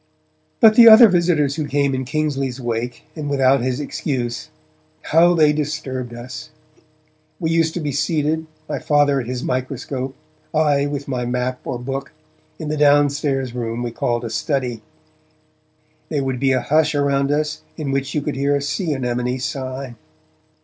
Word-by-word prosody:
But 220 -1 +7
the 230 +1 +8
other 225 +2 +10
visitors 170 -6 +1
who 155 -2 -2
came 140 -1 +1
in 130 0 -2
Kingsley's 135 -2 -2
wake 120 0 -3
and 150 -3 -4
without 135 -2 +3
his 125 +2 -1
excuse 140 -6 -3 0.5
how 175 +2 +4
they 155 -2 +4
disturbed 135 -4 -3
us! 120 +5 -8 0.9
We 165 -3 -1
used 165 -1 +1
to - - -1
be 150 -3 -2
seated, 155 +2 -1 0.2
my - - -3
Father 145 -2 +2
at 120 - -8
his 125 0 -4
microscope, 130 +1 -3 0.4
I 145 -2 +2
with 145 -1 -5
my 125 -3 -2
map 125 +1 -2
or 130 - -3
book, 135 +1 -5 0.4
in 155 - -5
the 155 - -2
down 145 -1 +5
stairs 135 -4 -2
room 120 -1 -3
we 120 - -3
called 120 +1 -1
the 115 - -5
study. 120 0 -2 1.3
There 145 -3 -1
would 130 -2 -2
be 135 0 +2
a 130 - +2
hush 155 0 +2
around 140 -1 +1
us 150 +1 -1 0.2
in 150 -4 -3
which 135 +2 -2
you 150 - 0
could 150 - -3
hear 140 +1 +1
a 140 - -1
sea 150 +3 -1
anemone 125 -1 -2
sigh. 130 0 -5
140 Hz, 170 wpm, -20 LUFS, 130-150 Hz, 1.3 s, other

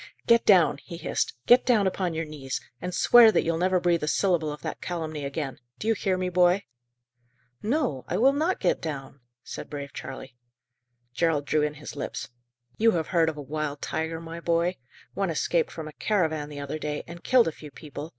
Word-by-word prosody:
"Get 235 0 +4
down!" 185 -6 +5
he 170 - -9
hissed; 160 - -2
"get 245 +1 +6
down 230 -5 +3
upon 185 -3 -1
your 165 0 -2
knees, 140 -4 -5 0.2
and 180 - -3
swear 230 +4 +7
that - - +2
you'll 165 0 0
never 185 +1 +2
breathe 175 -1 +2
a 150 - -2
syllable 165 -3 +1
of 150 - -9
that - - -5
calumny 160 -4 -4
again! 140 -2 -4 0.2
Do 215 - -5
you 225 - +4
hear 190 -3 0
me, 185 0 -1
boy?" 180 +2 +3 1.0
"No, 220 - 0
I 180 - -1
will 265 +6 +5
not 320 +6 0
get 180 - +1
down," 140 -3 -6 0.2
said - - -8
brave 140 -1 -6
Charley. 130 -1 -8 0.8
Gerald 155 0 +1
drew 150 +2 +1
in 150 0 -1
his 150 +1 -9
lips. 145 - -5 0.5
"You 225 +1 +4
have 165 -2 -1
heard 165 -3 +3
of 155 - -6
a 145 - -6
wild 150 0 -4
tiger, 160 0 -2
my 165 0 -7
boy? 170 +2 +1 0.4
One 195 -2 -1
escaped 165 +1 +1
from 160 -2 -7
a 155 - -9
caravan 160 -8 0
the 145 -1 -7
other 140 +2 -4
day, 150 -1 -3
and 170 0 -10
killed 255 -5 +4
a - - 0
few 150 -1 -11
people. 150 +1 -8
165 Hz, 205 wpm, -26 LUFS, 150-185 Hz, 1.0 s, swear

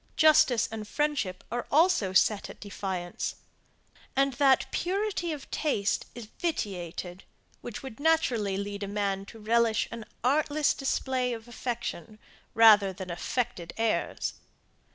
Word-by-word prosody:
Justice 310 -6 +5
and 215 -1 -6
friendship 285 -11 -1
are 240 0 -3
also 310 - +3
set 200 +2 +3
at - - -11
defiance, 190 -3 -4 0.8
and 275 0 +2
that 270 0 +4
purity 375 -1 -1
of 295 -3 -7
taste 210 -10 0
is 240 -2 -7
vitiated, 185 - -3 0.4
which 240 +1 -7
would 265 -3 -8
naturally 275 -11 +2
lead 200 0 -4
a 200 - -3
man 200 -1 -2
to 225 - -11
relish 225 0 +2
an 230 -1 -7 0.2
artless 290 +3 +2
display 260 -2 -1
of 225 0 -8
affection, 235 -6 -5 0.4
rather 215 -3 +7
than 185 -1 -7
affected 180 0 -3
airs. 225 -1 0
230 Hz, 130 wpm, -28 LUFS, 200-275 Hz, 0.8 s, rather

